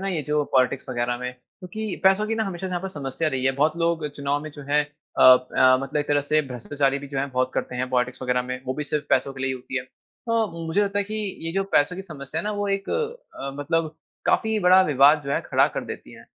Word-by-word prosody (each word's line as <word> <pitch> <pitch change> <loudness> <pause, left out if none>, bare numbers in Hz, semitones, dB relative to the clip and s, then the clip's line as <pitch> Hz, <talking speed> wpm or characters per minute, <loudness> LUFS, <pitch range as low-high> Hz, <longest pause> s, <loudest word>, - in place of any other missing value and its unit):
ना 195 - -1
ये 170 -6 -1
जो 150 +1 +1
पॉलिटिक्स 130 0 +2
वगैरह 120 -1 -1
में। 125 0 -4
क्योंकि 185 +10 -7
पैसों 195 +3 +4
की 225 - -1
ना 220 0 0
हमेशा 190 -1 -4
से - - -5
यहाँ 175 -1 -2
पर 195 - -3
समस्या 150 -1 -3
रही 130 -3 -2
है। 135 - +3
बहुत 155 +2 +3
लोग 165 -2 0
चुनाव 140 0 -1
में 155 - -7
जो 145 0 -11
है 150 +1 +4
अ 150 +1 -5
अ, 130 0 +6
मतलब 135 +2 -4
एक 145 - -5
तरह 145 0 +3
से 150 +2 +2
भ्रष्टाचारी 135 +2 -1
भी 140 - -9
जो 135 -1 -3
है, 140 - 0
बहुत 130 0 0
करते 125 - -2
हैं 125 +1 -2
पॉलिटिक्स 125 0 0
वगैरह 125 0 +1
में। 125 0 -5
वो 130 - -1
भी 150 - -3
सिर्फ 150 0 -2
पैसों 140 - +2
के 135 - -10
लिए - - +1
ही - - 0
होती 130 +1 -7
है। - - -4 0.5
हाँ, 230 -1 +2 0.2
मुझे 180 +6 +2
लगता 200 0 -1
है 200 - +1
कि 215 - -6 0.3
ये 165 - -2
जो 195 +2 0
पैसों 145 +5 +3
की 190 - -5
समस्या 155 -3 -6
है - - -8
ना 210 - -1
वो 205 - -1
एक 195 0 -2
अ, 465 - -4
मतलब 160 +2 -1 0.3
काफी 220 -1 +2
बड़ा 185 +1 +6
विवाद 145 +1 +5
जो 140 - -2
है - - +1
खड़ा - - +4
कर - - -2
देती - - -8
है। - - -14
150 Hz, 265 wpm, -24 LUFS, 130-180 Hz, 0.5 s, अ